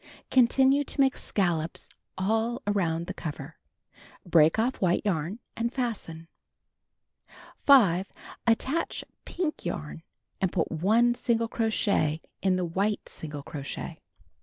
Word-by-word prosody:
Continue 265 +3 +4
to 285 - -5
make 270 -1 +4
scallops 170 -5 -1 0.3
all 225 +6 0
around 170 -5 0
the - - -5
cover. 150 -1 -7 0.7
Break 160 -1 +4
oft" 240 +4 0
white 180 -2 +2
yarn 180 +1 -1 0.2
and 235 +1 -1
fasten. 210 -11 -4 1.4
5. 200 -10 +6 0.4
Attach 265 +8 +1 0.2
pink 340 -4 -3
yarn, 160 -2 -5 0.4
and 190 -2 +1
put 165 - -1
1 220 +9 +3
single 230 -1 0
crochet 205 -9 +1 0.2
in 190 -1 +2
the 185 -1 0
wliite 200 +5 -1
single 150 -2 -6
crochet. 145 +3 -6
195 Hz, 115 wpm, -27 LUFS, 165-235 Hz, 1.4 s, 5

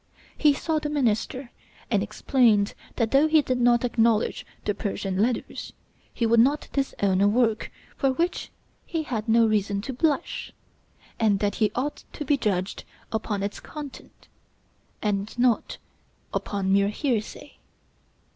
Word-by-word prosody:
He 300 -2 +4
saw 315 +2 0
the 300 - -3
minister, 255 -2 -1 0.4
and 205 -3 +3
explained 215 0 +2 0.2
that 225 -2 0
though 280 +3 +5
he 310 -1 +4
did 255 -2 -1
not 240 0 +4
acknowledge 230 -2 +1 0.2
the 205 - +1
'Persian 195 -1 -2
Letters,' 240 +1 -2 0.4
he 235 - -1
would 230 0 +4
not 280 +6 +3
disown 200 -9 +1
a 200 - +5
work 225 0 +1 0.3
for 270 - +2
which 340 +7 -1 0.3
he 325 -2 -3
had 230 -6 -3
no 230 +1 +5
reason 205 -2 +1
to 265 - -4
blush; 305 +4 -1 0.7
and 215 -3 +3
that 205 +1 -1
he 210 -2 +4
ought 290 +4 -2
to 300 - -5
be 290 - +3
judged 200 -7 -1 0.3
upon 210 -2 -2
its 200 - -3
contents, 295 -3 -10 0.8
and 205 +1 -1
not 245 -2 +2 0.6
upon 195 -2 -1
mere 200 0 +4
hearsay. 225 -1 -3
230 Hz, 145 wpm, -25 LUFS, 205-270 Hz, 0.8 s, though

